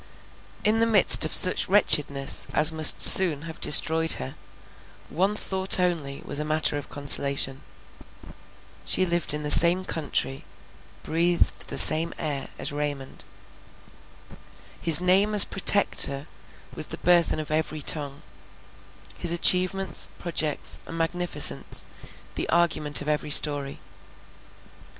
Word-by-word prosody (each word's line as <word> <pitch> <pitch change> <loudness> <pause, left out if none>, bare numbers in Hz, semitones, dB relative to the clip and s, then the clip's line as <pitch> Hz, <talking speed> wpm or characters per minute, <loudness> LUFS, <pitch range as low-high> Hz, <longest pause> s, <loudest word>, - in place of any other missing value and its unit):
In 215 +1 -1
the 230 - 0
midst 200 -7 +3
of 155 - -4
such 185 - +3
wretchedness 145 -8 -1
as 150 +1 +4
must 155 -1 +2
soon 160 -6 +3
have 165 -1 -12
destroyed 160 +1 +4
her, 65 0 -7 0.8
one 190 +6 -3
thought 190 -2 0
only 165 -7 -5
was 145 - -5
matter 155 0 -2
of 145 -1 -9
consolation. 140 -1 +1 1.2
She 185 - 0
lived 175 -2 -1
in 150 +1 -1
the 150 - -1
same 175 +2 +5
country, 145 -4 -5 0.6
breathed 170 +2 -2
the - - -6
same 160 +2 +6
air 145 -4 -6
as 145 - -3
Raymond. 145 -2 -7 1.6
His 165 -2 +4
name 190 +4 -1
as 205 - +9
Protector 180 -8 +1 0.5
was - - -2
the - - -9
burthen 170 -2 -1
of 155 0 -9
every 155 -1 -5
tongue; 145 -2 -2 1.0
his 175 - 0
achievements, 180 - 0
projects, 155 -3 -4
and 165 - -10
magnificence, 175 +1 -2 0.5
the - - -6
argument 155 -4 -2
of - - -13
every 150 0 -4
story. 145 -2 +1
160 Hz, 120 wpm, -22 LUFS, 145-180 Hz, 1.6 s, as